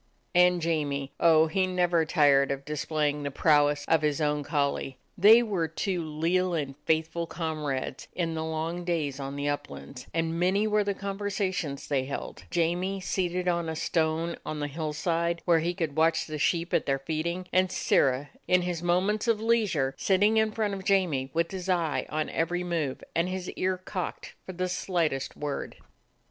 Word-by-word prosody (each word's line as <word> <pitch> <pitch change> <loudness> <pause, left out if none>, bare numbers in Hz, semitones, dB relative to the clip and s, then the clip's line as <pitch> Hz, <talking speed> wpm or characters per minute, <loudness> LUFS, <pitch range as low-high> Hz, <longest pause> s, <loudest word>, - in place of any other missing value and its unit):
And 180 -1 +4
Jamie 145 -4 -1
— - - -46
oh, 160 -1 +6
he 185 +4 +1
was 185 - -5
never 175 -2 +3
tired 145 -4 +4
of 140 0 -3
dis 150 -1 -3
playing 150 -2 0
the 145 - -2
prowess 145 0 +3
of 160 -1 +3
his 150 -1 0
own 150 -1 +1
collie. 140 -3 -1 0.2
They 220 +5 +7
were 190 -8 -1
two 175 +2 -2
leal 170 +4 0
and 140 -4 -2
faithful 160 +1 0
comrades 150 -6 -3
in 165 -2 -1
the 160 0 -3
long 160 +2 -3
days 155 -6 -1
on 135 0 -5
the 145 0 -2
uplands, 145 -2 -5
and 165 0 -1
many 190 +4 +2
were 210 -1 +2
the 200 -1 -1
conversations 195 -7 -3
they 135 -3 0
held; 140 - -6
Jamie 175 +3 0
seated 180 -1 -1
on 170 -2 0
a 160 - -3
stone 160 +1 0
on 155 - -4
the 145 - -1
hillside, 165 +3 -2
where 170 -2 +4
he 170 +2 -1
could 160 -5 -2
watch 160 +1 +3
the 155 -1 -5
sheep 170 +3 0
at - - +1
their 135 -1 +2
feeding, 160 +6 -3
and 185 0 +3
Sirrah, 135 -3 +1 0.2
in 180 0 +4
his 175 -2 -2
mo 175 +1 +2
ments 210 +3 -1
of 225 -2 +3
leisure, 210 -12 +1
sitting 205 +3 +3
in 220 0 +3
front 210 -2 -1
of 195 -1 -5
Jamie, 175 -10 +1
with 165 +2 0
his 190 -1 -5
eye 170 -4 0
on 155 0 -1
every 175 +2 -1
move 165 -6 -2
and 170 +2 +1
his 185 -1 -4
ear 185 0 -1
cocked 185 0 -5
for 185 - -5
the 185 +1 -2
slightest 165 -7 -1
word. 145 -1 -4
165 Hz, 185 wpm, -28 LUFS, 150-185 Hz, 0.2 s, They